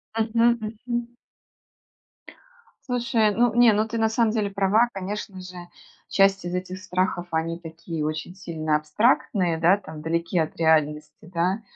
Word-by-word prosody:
Мгм, 230 Hz, +1 st, +2 dB
мгм. 235 Hz, +2 st, -4 dB, 1.8 s
Слушай, 235 Hz, -3 st, +2 dB
ну, 240 Hz, 0 st, +3 dB
не, 240 Hz, -2 st, +6 dB
ну, 215 Hz, +1 st, +2 dB
ты 230 Hz, +1 st, -4 dB
на 225 Hz, -, +3 dB
самом 225 Hz, 0 st, +1 dB
деле 215 Hz, -2 st, 0 dB
права, 200 Hz, +4 st, +3 dB
конечно 195 Hz, 0 st, -5 dB
же, 185 Hz, 0 st, -10 dB, 0.5 s
часть 195 Hz, -1 st, +3 dB
из 175 Hz, -, -3 dB
этих 185 Hz, 0 st, -4 dB
страхов, 185 Hz, -1 st, -1 dB
они 165 Hz, +1 st, -1 dB
такие 165 Hz, -1 st, -6 dB
очень 155 Hz, +3 st, -4 dB
сильно 160 Hz, -5 st, -1 dB
абстрактные, 175 Hz, -, +1 dB
да, 170 Hz, +4 st, +5 dB
там 155 Hz, -6 st, -10 dB
далеки 170 Hz, +2 st, -1 dB
от 160 Hz, -, -1 dB
реальности, 155 Hz, -2 st, +2 dB, 0.2 s
да, 185 Hz, +6 st, +1 dB
185 Hz, 145 wpm, -24 LUFS, 165-220 Hz, 1.8 s, не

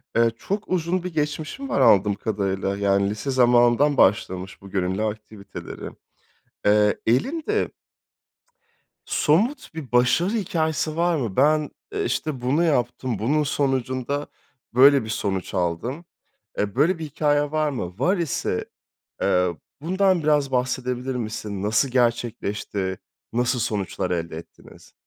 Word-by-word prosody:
Eee, 115 Hz, 0 st, +4 dB
çok 200 Hz, +2 st, -3 dB
uzun 180 Hz, 0 st, 0 dB
bir 180 Hz, -1 st, -5 dB
geçmişin 155 Hz, -, -3 dB
var -, -, +1 dB
anladığım 105 Hz, -4 st, +5 dB
kadarıyla. 100 Hz, -2 st, -2 dB
Yani 100 Hz, 0 st, +2 dB
lise 110 Hz, +7 st, -3 dB
zamanından 125 Hz, +3 st, +4 dB
başlamış 95 Hz, -1 st, +1 dB
bu 100 Hz, -, -11 dB
gönüllü 95 Hz, +1 st, -1 dB
aktiviteleri. 105 Hz, -1 st, -6 dB, 0.8 s
Eee, 105 Hz, 0 st, +4 dB
elinde 315 Hz, -, +1 dB, 1.4 s
somut 195 Hz, -, +1 dB
bir 145 Hz, -7 st, -8 dB
başarı 125 Hz, +9 st, +3 dB
hikâyesi 160 Hz, -7 st, -1 dB
var 170 Hz, 0 st, +2 dB
mı? 115 Hz, -10 st, -3 dB
Ben, 150 Hz, +2 st, +3 dB, 0.2 s
eee, 410 Hz, -1 st, -1 dB
işte, 155 Hz, -, -2 dB
bunu 135 Hz, +7 st, +1 dB
yaptım, 125 Hz, -, 0 dB
bunun 145 Hz, +9 st, +1 dB
sonucunda 135 Hz, 0 st, -1 dB, 0.5 s
böyle 135 Hz, 0 st, +6 dB
bir -, -, -8 dB
sonuç 100 Hz, -4 st, -2 dB
aldım. 95 Hz, -, -2 dB, 0.5 s
Eee, 105 Hz, 0 st, -1 dB
böyle 165 Hz, +6 st, +3 dB
bir 160 Hz, -, -5 dB
hikâyen 145 Hz, 0 st, 0 dB
var 155 Hz, -1 st, +1 dB
mı? 90 Hz, -8 st, -5 dB
Var 180 Hz, +10 st, +2 dB
ise, 170 Hz, -8 st, -1 dB, 0.6 s
eee, 90 Hz, -2 st, +2 dB, 0.2 s
bundan 185 Hz, +2 st, +2 dB
biraz 150 Hz, -2 st, +2 dB
bahsedebilir 125 Hz, 0 st, -1 dB
misin? 110 Hz, -4 st, -4 dB
Nasıl 105 Hz, +6 st, +2 dB
gerçekleşti, 110 Hz, -6 st, -1 dB, 0.3 s
nasıl 120 Hz, +2 st, +1 dB
sonuçlar 100 Hz, -4 st, -2 dB
elde 85 Hz, -2 st, -2 dB
ettiniz? 85 Hz, -, -13 dB
125 Hz, 125 wpm, -23 LUFS, 105-155 Hz, 1.4 s, böyle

